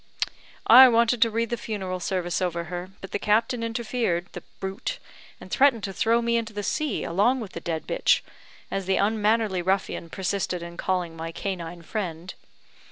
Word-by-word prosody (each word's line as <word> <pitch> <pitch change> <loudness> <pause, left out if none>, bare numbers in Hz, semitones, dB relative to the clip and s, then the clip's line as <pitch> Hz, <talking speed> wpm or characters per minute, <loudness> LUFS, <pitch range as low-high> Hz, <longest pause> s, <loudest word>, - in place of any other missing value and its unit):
I 255 +3 +10
wanted 235 0 +3
to 230 - +6
read 230 +1 -1
the 240 - 0
funeral 190 -5 -4
service 180 -1 -1
over 170 -2 -1
her, 175 +2 -6
but 195 - -9
the - - -1
captain 225 +4 +1
interfered 225 -6 -1
the - - -7 0.2
brute! 195 - -4 0.4
and - - -12
threatened 265 -6 +4
to 195 - -3
throw 230 +4 +2
me 235 0 +2
into 225 -1 -3
the 205 0 -4
sea 300 +1 -1
along 205 +10 +2
with 215 -5 -6
the - - -6
dead 165 -2 -3
bitch, - - +2 0.5
as 195 -1 -3
the 190 - +2
unmannerly 210 -2 +2
ruffian 190 -2 -1
persisted 185 -1 -2
in 170 0 -8
calling 180 -2 -2
my 165 0 -5
canine 175 -2 -5
friend. 175 -2 -4
200 Hz, 175 wpm, -25 LUFS, 180-230 Hz, 0.5 s, I